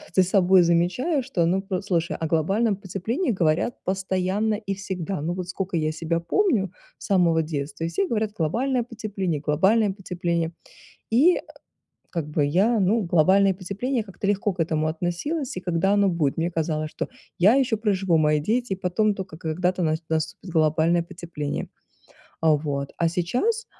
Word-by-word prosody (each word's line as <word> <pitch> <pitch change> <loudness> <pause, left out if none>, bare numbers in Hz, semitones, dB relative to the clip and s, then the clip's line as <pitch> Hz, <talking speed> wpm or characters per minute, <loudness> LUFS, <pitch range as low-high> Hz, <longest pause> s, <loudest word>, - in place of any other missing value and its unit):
за 190 - +6
собой 185 0 +4
замечаю, 185 - +1
что, 195 -10 0
ну, 190 +2 +1
послушай, 185 -3 -1
о 160 - -2
глобальном 195 +8 +1
потеплении 215 - -2
говорят 170 +4 +1
постоянно 190 +3 0
и 200 -2 -4
всегда. 190 -3 -4
Ну 165 +4 -2
вот, 180 -1 -5
сколько 185 0 -3
я 155 -1 0
себя 165 +1 -2
помню, 215 - +1 0.3
с - - -9
самого 175 -4 +3
детства, 155 +1 -4
все 170 +4 -1
говорят: 215 -1 -1
"Глобальное 235 - 0
потепление, 205 - -3
глобальное 190 +9 +3
потепление". 175 -4 -2 0.6
И, 295 +11 +4 0.7
как 165 -4 -3
бы, 150 -1 +1
я, 200 +10 +2
ну, 205 +4 +2
глобальное 190 +3 +4
потепление, 205 +7 -3
как-то 195 -1 -7
легко 205 0 +1
к 180 - -21
этому 155 -1 0
относилась. 175 - -2
И - - -4
когда 180 +2 +1
оно 200 -1 +3
будет? 155 -6 0
Мне 165 +1 0
казалось, 155 -2 -1
что - - -4 0.3
я 195 +6 +6
ещё 250 -5 +2
проживу, 195 -5 +1
мои 150 -1 +3
дети, 225 +7 0
и - - -3
потом 195 +3 +1
только, 190 -5 -7
когда-то 180 +3 -1
нас 155 0 0
наступит 160 +3 -2
глобальное 160 +1 +2
потепление. 170 -4 -5 0.7
А 160 -1 +4
вот. 140 -2 -3
А 170 - +2
сейчас, 245 - -1
185 Hz, 160 wpm, -24 LUFS, 165-205 Hz, 0.7 s, за